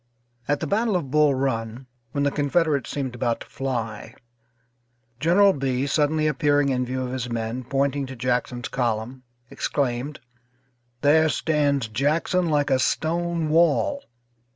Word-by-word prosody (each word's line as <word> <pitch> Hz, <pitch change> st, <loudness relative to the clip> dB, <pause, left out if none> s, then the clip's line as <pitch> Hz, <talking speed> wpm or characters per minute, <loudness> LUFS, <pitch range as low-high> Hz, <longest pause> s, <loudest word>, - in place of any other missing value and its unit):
At 145 Hz, 0 st, 0 dB
the -, -, -1 dB
battle 220 Hz, 0 st, +1 dB
of 150 Hz, -7 st, -2 dB
Bull 150 Hz, -2 st, +4 dB
Run, 120 Hz, -2 st, -2 dB, 0.3 s
when 140 Hz, +1 st, -1 dB
the 140 Hz, -, +2 dB
Confederates 145 Hz, 0 st, +1 dB
seemed 135 Hz, -3 st, -3 dB
about 120 Hz, -1 st, -1 dB
to -, -, -8 dB
fly, 115 Hz, -5 st, -4 dB, 1.0 s
General 190 Hz, +5 st, +5 dB
Bee 135 Hz, -1 st, -1 dB
suddenly 150 Hz, +2 st, +1 dB
appearing 145 Hz, -2 st, +2 dB
in 125 Hz, -1 st, 0 dB
view 130 Hz, +1 st, -2 dB
of 125 Hz, -, -5 dB
his 125 Hz, -1 st, -3 dB
men, 115 Hz, +2 st, -3 dB
pointing 140 Hz, +2 st, -1 dB
to 130 Hz, -, -8 dB
Jackson's 125 Hz, 0 st, -1 dB
column 120 Hz, +1 st, -2 dB, 0.3 s
exclaimed: 140 Hz, +1 st, -2 dB, 0.8 s
"There 155 Hz, +2 st, +4 dB
stands 145 Hz, -5 st, +1 dB
Jackson 155 Hz, +9 st, 0 dB
like 145 Hz, -2 st, +1 dB
a 130 Hz, -, +3 dB
stone 165 Hz, +3 st, 0 dB
wall." 170 Hz, -, +2 dB
140 Hz, 140 wpm, -24 LUFS, 125-155 Hz, 1.0 s, General